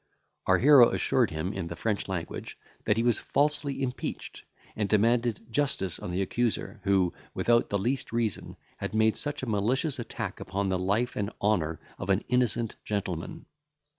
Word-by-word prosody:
Our -, -, +5 dB
hero 135 Hz, -3 st, +8 dB
assured -, -, +2 dB
him, 80 Hz, +5 st, -3 dB
in 95 Hz, -3 st, -4 dB
the 85 Hz, -, -6 dB
French 105 Hz, +4 st, -2 dB
language, 90 Hz, -4 st, -5 dB, 0.3 s
that 105 Hz, -, +2 dB
he 115 Hz, -, +2 dB
was 120 Hz, -2 st, +3 dB
falsely 145 Hz, -1 st, 0 dB
impeached, 125 Hz, -1 st, -5 dB, 0.3 s
and 105 Hz, -2 st, -1 dB
demanded 115 Hz, +1 st, +2 dB
justice 110 Hz, -, 0 dB
on -, -, -6 dB
the 90 Hz, +2 st, 0 dB
accuser, 115 Hz, +4 st, -2 dB
who, 95 Hz, -3 st, +3 dB, 0.2 s
without 120 Hz, 0 st, +3 dB
the 100 Hz, -, +1 dB
least 125 Hz, +7 st, -1 dB
reason, 115 Hz, -4 st, -2 dB, 0.2 s
had 100 Hz, -, -4 dB
made 110 Hz, 0 st, +3 dB
such 145 Hz, -2 st, -2 dB
a -, -, -3 dB
malicious 125 Hz, +7 st, 0 dB
attack 120 Hz, -, -5 dB
upon 95 Hz, +1 st, -2 dB
the 95 Hz, -1 st, 0 dB
life 100 Hz, +6 st, 0 dB
and 100 Hz, -1 st, -1 dB
honour 85 Hz, -7 st, +1 dB, 0.2 s
of 95 Hz, -, -5 dB
an 95 Hz, +2 st, +2 dB
innocent 120 Hz, -2 st, +1 dB
gentleman. 95 Hz, -5 st, -4 dB
110 Hz, 165 wpm, -28 LUFS, 95-120 Hz, 0.3 s, hero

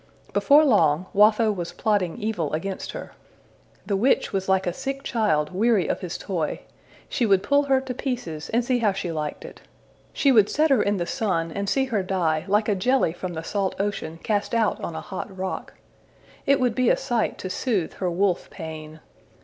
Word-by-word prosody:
Before 295 Hz, +2 st, +5 dB
long, 170 Hz, -, +3 dB
Watho 215 Hz, +2 st, +5 dB
was 175 Hz, -4 st, -5 dB
plotting 205 Hz, -6 st, 0 dB
evil 210 Hz, -10 st, -2 dB
against 190 Hz, +5 st, -4 dB
her. -, -, -7 dB, 0.7 s
The 200 Hz, -, 0 dB
witch 235 Hz, +4 st, +2 dB
was 195 Hz, -1 st, -2 dB
like 190 Hz, 0 st, +2 dB
a 175 Hz, -, -1 dB
sick 275 Hz, +4 st, -4 dB
child 175 Hz, -, +1 dB
weary 215 Hz, -1 st, +2 dB
of -, -, -1 dB
his 180 Hz, -3 st, -5 dB
toy: 170 Hz, -6 st, -3 dB, 0.5 s
she 235 Hz, -, 0 dB
would 195 Hz, -2 st, +3 dB
pull 285 Hz, +1 st, +3 dB
her 270 Hz, -1 st, +3 dB
to 265 Hz, -1 st, -5 dB
pieces 240 Hz, -, -4 dB
and 235 Hz, +1 st, +1 dB
see 250 Hz, 0 st, +1 dB
how 210 Hz, -4 st, +2 dB
she 185 Hz, -3 st, -3 dB
liked 150 Hz, -2 st, -4 dB
it. -, -, -11 dB, 0.5 s
She 280 Hz, -, +3 dB
would 215 Hz, -5 st, +5 dB
set 310 Hz, 0 st, +2 dB
her 260 Hz, -6 st, +5 dB
in 205 Hz, 0 st, +1 dB
the 175 Hz, -, -1 dB
sun 175 Hz, -8 st, -1 dB
and 200 Hz, +3 st, -3 dB
see 270 Hz, +3 st, +2 dB
her 225 Hz, -6 st, -1 dB
die, 175 Hz, -5 st, 0 dB
like 210 Hz, +2 st, +2 dB
a 210 Hz, -, +3 dB
jelly 200 Hz, -2 st, +2 dB
from 180 Hz, 0 st, -5 dB
the 160 Hz, -, -5 dB
salt 195 Hz, +2 st, -1 dB
ocean 200 Hz, -5 st, -3 dB
cast 210 Hz, +2 st, -1 dB
out 225 Hz, -3 st, +1 dB
on 170 Hz, -, -4 dB
a -, -, -4 dB
hot 190 Hz, +1 st, -7 dB
rock. 190 Hz, 0 st, -5 dB, 0.7 s
It 280 Hz, 0 st, +4 dB
would 250 Hz, -3 st, +2 dB
be 255 Hz, +1 st, +2 dB
a -, -, +4 dB
sight 235 Hz, -3 st, -1 dB
to 185 Hz, -, -5 dB
soothe 205 Hz, -6 st, -1 dB
her 185 Hz, -, -2 dB
wolf 180 Hz, +1 st, 0 dB
pain. 155 Hz, -2 st, -8 dB
200 Hz, 200 wpm, -24 LUFS, 175-235 Hz, 0.7 s, Before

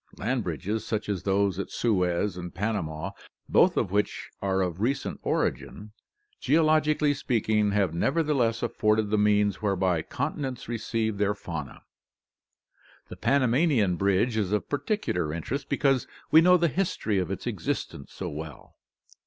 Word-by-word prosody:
— -, -, -19 dB
Land 125 Hz, +2 st, -1 dB
bridges, 100 Hz, +6 st, -3 dB
such 110 Hz, -2 st, -3 dB
as 100 Hz, -4 st, -1 dB
those 100 Hz, -1 st, +1 dB
at 100 Hz, -, -3 dB
Suez 90 Hz, -3 st, 0 dB
and 90 Hz, -1 st, -7 dB
Pan 105 Hz, +5 st, -1 dB
ama, 80 Hz, 0 st, -4 dB, 0.3 s
both -, -, +4 dB
of 90 Hz, -, 0 dB
which 105 Hz, +1 st, -1 dB
are 95 Hz, -1 st, +1 dB
of 90 Hz, +1 st, -4 dB
recent 135 Hz, +5 st, -1 dB
origin, 105 Hz, +1 st, -2 dB, 0.5 s
geologically 155 Hz, 0 st, +3 dB
speaking, 110 Hz, -6 st, +1 dB
have 100 Hz, -4 st, +1 dB
nevertheless 135 Hz, -, +1 dB
afforded 110 Hz, -3 st, +1 dB
the 110 Hz, -, +3 dB
means 105 Hz, 0 st, +2 dB
whereby 95 Hz, -5 st, +1 dB
continents 135 Hz, -, -4 dB
received 110 Hz, -2 st, -2 dB
their 105 Hz, 0 st, +1 dB
faunas. 80 Hz, -8 st, -7 dB, 1.3 s
The -, -, -7 dB
Panamanian 130 Hz, -, +2 dB
bridge 100 Hz, +5 st, +1 dB
is 100 Hz, -3 st, 0 dB
of 105 Hz, -, 0 dB
particular 145 Hz, -, -1 dB
interest 130 Hz, -, -4 dB
because 135 Hz, -3 st, +1 dB, 0.2 s
we 160 Hz, -, +8 dB
know 180 Hz, +1 st, +6 dB
the 170 Hz, -1 st, +2 dB
history 160 Hz, -, -1 dB
of 90 Hz, -2 st, -2 dB
its 95 Hz, -, -5 dB
existence 70 Hz, -, -4 dB
so -, -, -6 dB
well. 75 Hz, +1 st, -8 dB
105 Hz, 145 wpm, -27 LUFS, 95-130 Hz, 1.3 s, we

